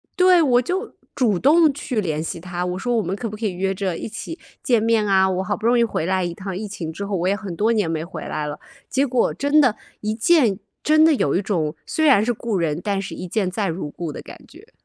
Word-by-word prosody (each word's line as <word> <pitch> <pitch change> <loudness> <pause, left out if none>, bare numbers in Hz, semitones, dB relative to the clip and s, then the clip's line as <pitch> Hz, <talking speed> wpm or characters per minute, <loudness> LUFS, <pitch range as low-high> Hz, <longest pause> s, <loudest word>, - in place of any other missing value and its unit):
对， 365 -1 +5
我 250 -5 +4
就 370 - -3 0.2
主 215 -9 +2
动 310 +1 +5
去 250 -5 -2
联 155 -4 -2
系 165 +1 -5
她， 180 0 -4
我 180 0 -3
说 240 +4 -1
我 220 - +2
们 195 0 -3
可 225 +1 -4
不 210 - -8
可 220 - -4
以 190 - -1
约 190 +2 -1
着 185 -3 -2
一 - - -6
起， 325 +10 -7 0.2
见 235 -4 +2
面 225 -2 +2
啊？ 190 -1 +4
我 185 0 -1
好 205 +2 -1
不 220 - -7
容 240 0 +4
易 - - +5
回 205 - -2
来 185 +1 +1
一 175 - -3
趟 190 +1 -6
疫 210 +2 -4
情 170 -5 -5
之 200 +5 -5
后， 200 -1 -2
我 175 - -1
也 190 - +3
很 195 -3 -5
多 215 +6 +2
年 210 -7 +1
没 160 -1 -2
回 170 -2 -8
来 150 - -3
了。 150 0 -5 0.3
结 275 +2 +1
果 250 -1 +1
真 285 +2 +3
的 250 -6 +2 0.2
一 215 0 -1
见， 230 - +3 0.2
真 310 +1 +5
的 320 - +5
有 160 - +1
一 - - 0
种 165 -7 -1
虽 315 - 0
然 260 -8 +6
是 240 - +1
故 230 -2 -2
人， 165 -1 -1
但 200 -2 -1
是 - - -6
一 180 - -7
见 200 -3 0
再 195 0 -2
如 165 -2 -4
故 165 +1 -5
的 - - -7
感 - - -11
觉。 - - -17
205 Hz, 290 characters per minute, -22 LUFS, 180-245 Hz, 0.3 s, 然